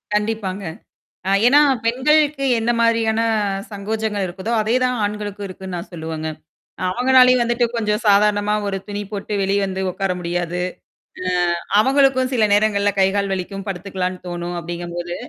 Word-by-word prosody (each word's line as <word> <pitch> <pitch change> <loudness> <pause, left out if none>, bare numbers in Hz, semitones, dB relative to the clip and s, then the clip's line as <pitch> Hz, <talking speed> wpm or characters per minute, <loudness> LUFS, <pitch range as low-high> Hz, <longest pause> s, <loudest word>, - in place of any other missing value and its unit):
கண்டிப்பாங்க. 210 -2 -2 0.7
ஆ - - +2 0.2
ஏன்னா 285 +4 +6 0.2
பெண்களுக்கு 280 +4 +2
என்ன 230 +1 0
மாதிரியான 225 -1 +2 0.5
சங்கோஜங்கள் 210 0 -2
இருக்குதோ! 190 +6 -5
அதேதான் 250 +3 +1
ஆண்களுக்கும் 205 -1 -4
இருக்குன்னு 185 -1 -7
நான் 170 - -7
சொல்லுவங்க. 160 -1 -5 0.6
அவுங்கனாலையும் 255 +3 +5
வந்துட்டு 240 +1 +1
கொஞ்சம் 210 -1 0
சாதாரணமா 205 0 +3
ஒரு 195 -1 -2
துணி 205 0 -4
போட்டு 210 0 -5
வெளிய 195 +1 +1
வந்து 190 0 -3
உட்கார 190 +1 -2
முடியாது 175 0 -2 0.6
ஆ, 185 - -3 0.5
அவங்களுக்கும் 265 +1 +3
சில 225 -4 +3
நேரங்கள்ல 205 -1 +3
கை, 190 - +5
கால் 200 -1 0
வலிக்கும். 195 +1 -4
படுத்துக்கலாம்ன்னு 185 -1 -4
தோணும், 175 0 -4
அப்பிடிங்கும்போது 175 +1 -5
205 Hz, 135 wpm, -20 LUFS, 185-230 Hz, 0.7 s, ஏன்னா